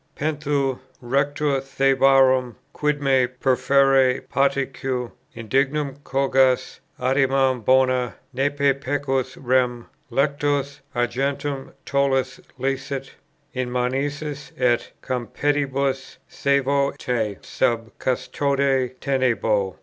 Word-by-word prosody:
"Pentheu, 145 -3 -1 0.2
Rector 140 +2 0
Thebarum, 135 -2 +3 0.2
quid 150 -1 -1
me 130 -2 +3
perferre 130 +1 +3
patique 140 -1 0 0.5
Indignum 135 +5 0
cogas?" 135 -1 +2 0.2
"Adimam 130 -1 +2
bona." 130 0 +3 0.2
"Nempe 140 +1 +2
pecus, 135 -1 -1
rem, 125 -2 +1 0.3
Lectos, 140 +1 0 0.2
argentum; 135 +3 -2
tollas 140 -1 0 0.2
licet." 135 +1 -3 0.4
"In 130 -1 -2
manicis 140 +3 -2
et 120 -2 +1
Compedibus, 135 +1 -1
sævo 140 0 +1
te 110 -5 -2
sub 115 -1 -1
custode 135 -1 0
tenebo." 115 -8 +1
135 Hz, 80 wpm, -23 LUFS, 130-140 Hz, 0.5 s, Thebarum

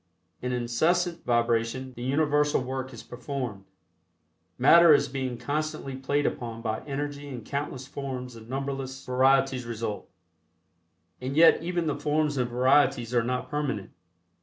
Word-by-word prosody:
In 125 - -2
incessant 160 +9 0
vibration 120 +2 0
the 120 - -10
universal 145 +2 +2
work 130 0 -4
is 115 -3 -10
performed. 125 -5 -5 0.9
Matter 170 -2 +7
is - - +1
being 130 -2 -3
constantly 150 0 -3
played 140 +2 0
upon 115 -1 -3
by 110 -1 -1
energy 145 0 -4
and 125 -5 -7
countless 140 -2 -4
forms 130 -3 -6
and 115 0 -13
numberless 135 0 -4
varieties 130 0 +2
result, 115 -2 -4 1.1
and 130 +3 -3
yet 165 0 +7
even 175 0 -1
the 150 - 0
forms 150 -1 0
and 125 -1 0
varieties 125 -1 +3
are 120 - +4
not 125 +2 -2
permanent. 145 -9 -2
130 Hz, 135 wpm, -27 LUFS, 120-145 Hz, 1.1 s, Matter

